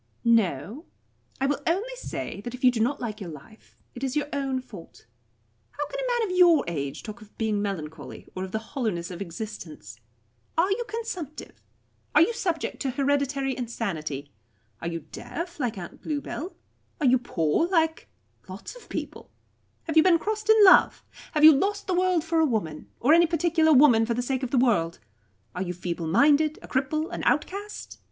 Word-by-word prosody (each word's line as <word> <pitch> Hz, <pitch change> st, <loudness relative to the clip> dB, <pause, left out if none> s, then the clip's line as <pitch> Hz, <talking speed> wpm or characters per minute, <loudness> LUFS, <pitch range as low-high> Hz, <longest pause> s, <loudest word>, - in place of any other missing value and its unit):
"No. 225 Hz, -, +1 dB, 0.5 s
I 270 Hz, -, +1 dB
will 280 Hz, +1 st, 0 dB
only 410 Hz, +10 st, 0 dB
say -, -, -6 dB
that 240 Hz, +3 st, -6 dB
if 255 Hz, -, -14 dB
you 250 Hz, -, +7 dB
do 240 Hz, -, -3 dB
not 255 Hz, +6 st, +1 dB
like 220 Hz, -3 st, -5 dB
your 185 Hz, -, -5 dB
life, 160 Hz, +9 st, -14 dB
it 245 Hz, -, -8 dB
is 265 Hz, 0 st, -2 dB
your 295 Hz, -, +1 dB
own 270 Hz, -2 st, -1 dB
fault. 205 Hz, -, -13 dB, 0.6 s
How 295 Hz, -, -4 dB
can -, -, -6 dB
a -, -, -2 dB
man -, -, 0 dB
of -, -, -2 dB
your 350 Hz, -4 st, +6 dB
age 145 Hz, -3 st, -4 dB
talk 220 Hz, +2 st, -8 dB
of 215 Hz, -1 st, -17 dB
being 215 Hz, -2 st, 0 dB
melancholy, 160 Hz, -7 st, -6 dB
or 185 Hz, -, -4 dB
of 190 Hz, -, -6 dB
the 220 Hz, -, -1 dB, 0.2 s
hollowness 205 Hz, -, -2 dB
of 175 Hz, -, -7 dB
existence? 170 Hz, -, -8 dB, 0.6 s
Are 360 Hz, +4 st, +3 dB
you 475 Hz, +4 st, 0 dB
consumptive? 370 Hz, -, -6 dB, 0.5 s
Are 300 Hz, -, +7 dB
you 470 Hz, -, 0 dB
subject 350 Hz, -8 st, -2 dB
to 275 Hz, -, 0 dB
hereditary 275 Hz, 0 st, 0 dB
insanity? 160 Hz, -, -4 dB, 0.5 s
Are 165 Hz, -, -3 dB
you 165 Hz, -1 st, -3 dB
deaf, 345 Hz, 0 st, -6 dB
like 245 Hz, -6 st, -2 dB
Aunt 175 Hz, -2 st, -9 dB
Bluebell? 300 Hz, +3 st, -4 dB, 0.4 s
Are 300 Hz, -, 0 dB
you 255 Hz, 0 st, +5 dB
poor, 185 Hz, -, 0 dB
like 325 Hz, -3 st, 0 dB, 0.4 s
lots 190 Hz, -, -8 dB
of -, -, -15 dB
people? -, -, -6 dB, 0.5 s
Have 320 Hz, -1 st, -2 dB
you -, -, +9 dB
been 345 Hz, 0 st, +5 dB
crossed 430 Hz, +4 st, -4 dB
in 440 Hz, -, +7 dB
love? 375 Hz, -, +6 dB, 0.3 s
Have 305 Hz, -2 st, +1 dB
you 315 Hz, -, +12 dB
lost 405 Hz, +8 st, 0 dB
the 370 Hz, -, -1 dB
world 360 Hz, -2 st, +2 dB
for 330 Hz, 0 st, 0 dB
a 320 Hz, -, +5 dB
woman, 185 Hz, -, -3 dB
or 285 Hz, +6 st, +4 dB
any 340 Hz, +1 st, +6 dB
particular 330 Hz, -1 st, +2 dB
woman 255 Hz, -6 st, +6 dB
for 235 Hz, -, 0 dB
the 245 Hz, -, -1 dB
sake 260 Hz, +1 st, -1 dB
of 255 Hz, -, -3 dB
the 260 Hz, -, 0 dB
world? 205 Hz, -10 st, +2 dB, 0.6 s
Are 180 Hz, -, -4 dB
you 180 Hz, -1 st, -3 dB
feebleminded, 280 Hz, -, +2 dB
a -, -, -10 dB
cripple, 310 Hz, +6 st, -1 dB
an -, -, -4 dB
outcast? 400 Hz, +7 st, -2 dB
265 Hz, 190 wpm, -26 LUFS, 200-325 Hz, 0.6 s, you